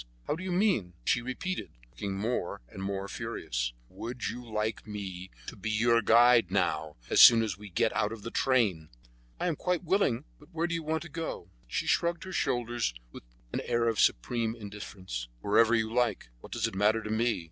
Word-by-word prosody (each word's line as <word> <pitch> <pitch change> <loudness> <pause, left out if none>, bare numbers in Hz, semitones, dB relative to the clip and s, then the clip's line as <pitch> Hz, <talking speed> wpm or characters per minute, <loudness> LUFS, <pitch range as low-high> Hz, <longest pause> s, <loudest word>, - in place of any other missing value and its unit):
How - - 0
do 180 - -7
you 185 - -3
mean?" 175 - +1
She 120 - +2
repeated, 125 - -4
looking 95 +10 -4
more 110 -3 -2
and 95 - -9
more 100 0 -3
furious: - - -3
"Would 120 - -5
you 125 - -6
like 110 -1 -3
me 95 -3 -6 0.2
to - - -7
be 105 +3 -4
your 115 +2 +3
guide 115 -2 +6
now, 80 -5 0 0.2
as - - +6
soon 115 -1 +10
as 105 -5 -2
we 105 +2 -11
get 110 +5 +1
out 105 -1 0
of 115 -2 -8
the 115 - -5
train?" 105 - +1 0.5
"I - - -1
am 170 -3 +1
quite 180 +1 -1
willing; 160 - +1
but 150 - -18
where 165 0 -1
do 170 - -2
you 165 - -1
want 160 +1 -2
to 170 - -10
go." 160 - -5 0.2
She - - -2
shrugged 170 0 +1
her 190 - -7
shoulders 120 - 0 0.2
with - - -10 0.3
an - - -1
air 120 0 +1
of 115 -2 0
supreme 115 - +2
indifference. 100 - -7
"Wherever 115 - +4
you 110 -1 0
like; 120 - 0
what - - -13
does - - 0
it - - -2
matter 105 +3 +2
to 105 - -4
me?" 115 0 +1
110 Hz, 200 wpm, -30 LUFS, 100-125 Hz, 0.5 s, soon